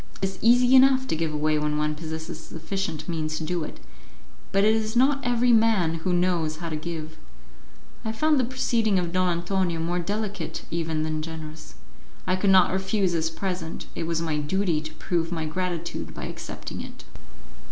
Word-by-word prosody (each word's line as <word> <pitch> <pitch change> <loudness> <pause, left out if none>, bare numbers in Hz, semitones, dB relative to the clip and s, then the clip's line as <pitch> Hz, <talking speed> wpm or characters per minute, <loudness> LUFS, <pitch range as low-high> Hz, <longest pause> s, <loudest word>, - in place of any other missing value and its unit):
It 190 - 0
is 190 - -11
easy 245 +2 +6
enough 260 0 +6
to - - +1
give 160 0 -1
away 150 0 +1
when 150 0 0
one 150 0 +1
possesses 160 0 -6
sufficient 160 0 -4
means 155 -2 -2
to - - -4
do 170 +1 -1
it, - - -8 0.7
but 195 +1 +3
it 215 +1 +5
is 220 0 -1
not 270 +3 +4
every 245 0 +3
man 215 -8 +3
who 180 - 0
knows 175 -3 +1
how 165 +1 -5
to 155 - -2
give. 160 0 -5 0.9
I 220 - -1
found 300 +6 +2
the - - +3
proceeding 230 -4 +1
of 175 -2 0
Don 185 0 +2
Antonio 175 0 0
more 175 +2 0
delicate 200 -1 -3
even 160 -2 -1
than 155 0 -2
generous; 155 -1 -8 0.5
I 185 - +2
could 195 +1 +1
not 190 -2 +6
refuse 190 0 +1
his 165 -1 0
present; 180 -1 -4
it 165 - -3
was 165 0 0
my 160 -2 -1
duty 170 +1 0
to 155 0 -8
prove 165 -2 -1
my 160 -2 -2
gratitude 170 +1 -3
by - - -6
accepting - - -6
it. - - -10
175 Hz, 185 wpm, -26 LUFS, 160-200 Hz, 0.9 s, easy